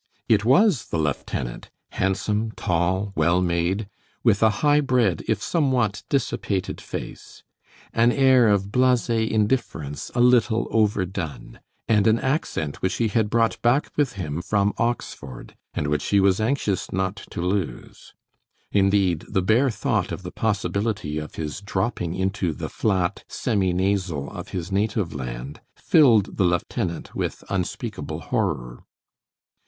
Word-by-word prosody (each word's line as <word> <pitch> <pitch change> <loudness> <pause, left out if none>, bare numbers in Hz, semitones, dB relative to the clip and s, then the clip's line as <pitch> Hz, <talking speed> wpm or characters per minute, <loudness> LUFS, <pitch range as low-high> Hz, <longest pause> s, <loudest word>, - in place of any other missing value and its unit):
It 105 -2 +3
was 145 - +4
the - - -2
lieutenant, 70 -5 -3 0.2
handsome, 105 +3 -1
tall, 90 +3 0
well 85 +1 +3
made, 90 +3 0 0.4
with 110 -4 +3
a 110 - +6 0.2
high 145 0 +5
bred 125 -9 +1
if - - 0
somewhat 130 - +1
dissipated 100 -8 -1
face, - - -8 0.5
an 115 +1 +4
air 130 -3 +5
of 100 -1 +1
blase 125 -1 +2
indifference 110 - -1
a - - 0
little 120 -2 +4
overdone, 95 -7 -1 0.3
and 105 -2 +3
an 110 +1 +5
accent 130 - -2
which 95 +1 0
he 115 -2 +1
had 105 0 +1
brought 115 0 +1
back 120 +5 +2
with 145 -3 +1
him 85 -4 -4
from 100 +1 +1
Oxford, 95 - -4 0.2
and - - -1
which 75 0 -1
he 100 - +3
was 95 +1 +3
anxious 110 -5 -1
not 95 +1 -1
to - - -7
lose. 90 -7 -3 0.6
Indeed, 95 -4 +2
the 95 -3 0
bare 115 +8 +3
thought 105 -3 -1
of 95 - -5
the 90 - -6
possibility 100 -6 -1
of 75 - -8
his 75 +4 -5
dropping 95 -3 -2
into 95 -2 -1
the - - -5
flat, 95 -5 0
semi 95 -4 0
nasal 90 -6 -1
of - - -7
his 90 0 -5
native 105 -2 0
land 65 +1 -6
filled 120 - +4
the 100 - +3
lieutenant 85 0 -1
with - - -3
unspeakable 95 -3 -3
horror. - - -2
100 Hz, 140 wpm, -24 LUFS, 90-115 Hz, 0.6 s, a